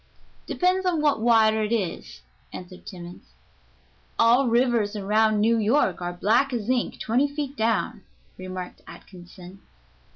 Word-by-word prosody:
"Depends 370 +1 +1
on 360 -3 0
what 290 -6 +1
water 220 -2 +4
it 215 +1 -2
is," 205 -7 -3 0.3
answered 180 0 -11
Timmans. 175 -2 -11 0.8
"All 240 +3 +4
rivers 235 -3 +1
around 215 +1 +1
New 225 +2 +2
York 215 -4 +1
are 175 0 -3
black 225 +10 +1
as 230 -2 -3
ink 250 -2 -2
twenty 250 +6 +1
feet 285 -1 -5
down," 225 -2 -1 0.3
remarked 185 -1 -8
Atkinson. 180 +1 -13
220 Hz, 130 wpm, -24 LUFS, 195-245 Hz, 0.8 s, water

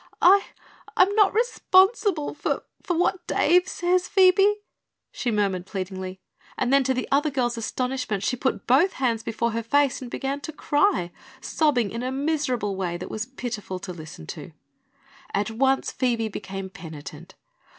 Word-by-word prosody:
"I 390 +3 +6 0.5
I'm 385 +2 +5
not 415 -2 +5
responsible 390 -6 +2
for 295 - -2 0.2
for 355 -4 -2
what 355 0 0
Dave 360 +2 +3
says, 360 -1 0
Phoebe," 390 +2 +5 0.6
she 245 - -3
murmured 195 -4 0
pleadingly; 190 -1 -5 0.4
and 250 - 0
then 275 0 +5
to 260 0 +1
the 255 - -2
other 290 +3 +3
girl's 250 -4 -1
astonishment 240 -3 -2
she 250 - 0
put 250 -5 -2
both 290 +10 +4
hands 235 -4 0
before 230 +1 -2
her 230 +1 -2
face 275 +4 +1
and 250 - -7
began 275 +3 -3
to 315 - -6
cry, 295 - +1 0.3
sobbing 265 -6 +1
in 230 - -4
a 255 +1 -2
miserable 265 -7 -1
way 180 -2 -2
that 175 - -7
was 215 +1 -4
pitiful 240 -7 -5
to 180 0 -7
listen 155 - -10
to. 155 - -8 0.8
At 205 +2 0
once 265 +4 +1
Phoebe 235 -4 0
became 195 -2 -6
penitent. 160 -4 -10
255 Hz, 160 wpm, -25 LUFS, 205-315 Hz, 0.8 s, I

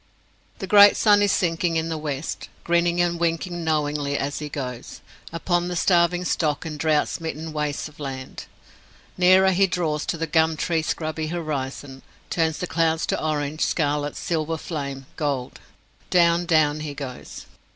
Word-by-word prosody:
The 195 - -5
great 205 +1 +7
sun 205 -2 +5
is 205 -1 +3
sinking 165 -1 0
in 160 0 0
the 165 - -2
west, 150 -1 -4
grinning 170 0 +1
and 175 -1 +1
winking 170 +1 -1
knowingly 145 -2 0
as 145 +1 -3
he 150 -1 -5
goes, 125 -4 -6 0.3
upon 175 +1 0
the 180 - -3
starving 175 0 +2
stock 155 -4 0
and 155 -2 -6
drought 155 -1 +2
smitten 160 -1 -5
wastes 150 -1 -2
of 150 -1 -17
land. 135 -2 -6 0.7
Nearer 185 +1 +5
he 195 +1 +3
draws 160 -4 -2
to 180 - -1
the 165 - -1
gum 160 0 +2
tree 165 +1 0
scrubby 155 0 -3
horizon, 145 -4 -4 0.3
turns 160 -2 +1
the - - -3
clouds 165 -2 +1
to - - -2
orange, 155 0 -2
scarlet, 145 -2 0
silver 160 -1 -2
flame, 140 -5 -5
gold! 140 -5 -2 0.5
Down, 170 -1 +3
down 155 -2 +3
he 150 -2 -5
goes. 135 -3 -8
160 Hz, 160 wpm, -23 LUFS, 145-170 Hz, 0.7 s, great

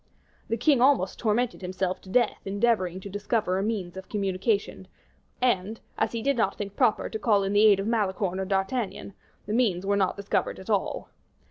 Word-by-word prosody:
The 230 - 0
king 250 +2 +3
almost 255 -9 +3
tormented 230 +1 0
himself 185 0 -2
to 190 - -14
death 235 +3 +1
endeavoring 195 -3 0
to 200 - -8
discover 205 -1 -1
a - - -1
means 200 -5 -3
of 190 0 -9
communication; 195 -1 -1 0.5
and, 220 -3 0 0.2
as - - 0
he 230 -1 -4
did 280 +1 +2
not 225 - +1
think 200 -1 -5
proper 215 - +2
to 220 - -5
call 205 -3 +3
in 195 +1 -1
the 210 +1 +6
aid 200 -2 +5
of 195 - -2
Malicorne 195 -4 0
or 190 - -1
D'Artagnan, 195 +2 -2 0.3
the 210 - -3
means 205 -7 +1
were 200 +1 +2
not 195 -1 +1
discovered 200 0 -1
at 190 +4 -6
all. 200 -2 -1
200 Hz, 195 wpm, -26 LUFS, 190-225 Hz, 0.5 s, the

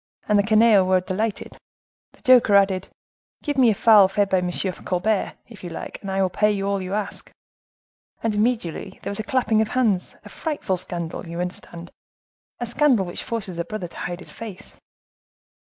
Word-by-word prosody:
and 210 -1 +3
the - - +6
canaille 215 -1 +5
were 185 0 +3
delighted. 195 +3 -3 0.6
The - - -22
joker 245 -5 +6
added, 195 -1 +3 0.6
'Give 290 -2 -2
me 255 -3 +5
a 215 - +2
fowl 210 -3 +6
fed 200 +1 0
by 190 - +4
M. 180 0 -2 0.3
Colbert, 190 +3 -1
if 225 -5 -14
you 175 - -5
like! 165 - -7
and 195 - -6
I 190 0 -1
will 185 - +1
pay 210 0 +1
all 200 0 -1
you 185 +2 -3
ask.' 210 -1 -4 0.9
And 225 -1 0
immediately 215 -5 -1
there - - -3
was 200 - 0
a - - -2
clapping 225 -2 +1
of 220 - 0
hands. 215 -7 0
A - - -10
frightful 295 - -3
scandal! 170 -2 -2
you 170 +1 -6
understand; 175 -1 -6 0.7
a 240 - -2
scandal 240 -4 +2
which 175 - -6
forces 215 -8 -4
a - - 0
brother 185 +1 -5
to - - -14
hide 175 +1 -5
his - - -12
face." 215 -5 -10
200 Hz, 190 wpm, -23 LUFS, 185-225 Hz, 0.9 s, the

